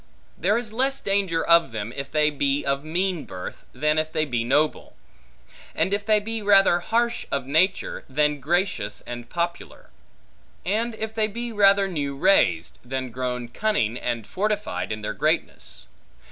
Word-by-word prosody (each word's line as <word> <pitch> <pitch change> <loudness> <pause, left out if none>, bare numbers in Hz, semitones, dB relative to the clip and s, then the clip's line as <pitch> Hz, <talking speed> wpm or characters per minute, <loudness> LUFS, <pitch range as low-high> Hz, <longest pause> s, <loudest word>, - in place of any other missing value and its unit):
There 200 +7 +1
is 230 -3 -4
less 270 +3 +1
danger 195 -6 +1
of 170 -3 +5
them, 110 +1 -5
if 140 -1 -5
they 150 -1 +2
be 140 0 0
of 140 0 0
mean 175 +1 -1
birth, 90 -1 -8
than 150 +1 +1
if 155 0 -2
they 155 0 0
be 120 -5 -1
noble; 145 +5 0 0.8
and 190 - +1
if 205 0 0
they 215 0 +4
be 225 +1 -4
rather 195 -3 +5
harsh 235 +5 0
of 140 -2 -1
nature, 165 +8 +1
than 150 +2 +1
gracious 140 - -1
and 120 -1 -7
popular: 170 0 -4 0.7
and 220 +5 0
if 220 0 -4
they 220 -1 +1
be 235 +3 -5
rather 200 -1 +5
new 145 -6 -3
raised, 115 - +3
than 130 0 -4
grown 125 0 -3
cunning, 120 - 0
and 120 -3 -3
fortified, 210 - -2
in 110 0 -4
their - - -2
greatness. - - -2
160 Hz, 160 wpm, -24 LUFS, 130-205 Hz, 0.8 s, of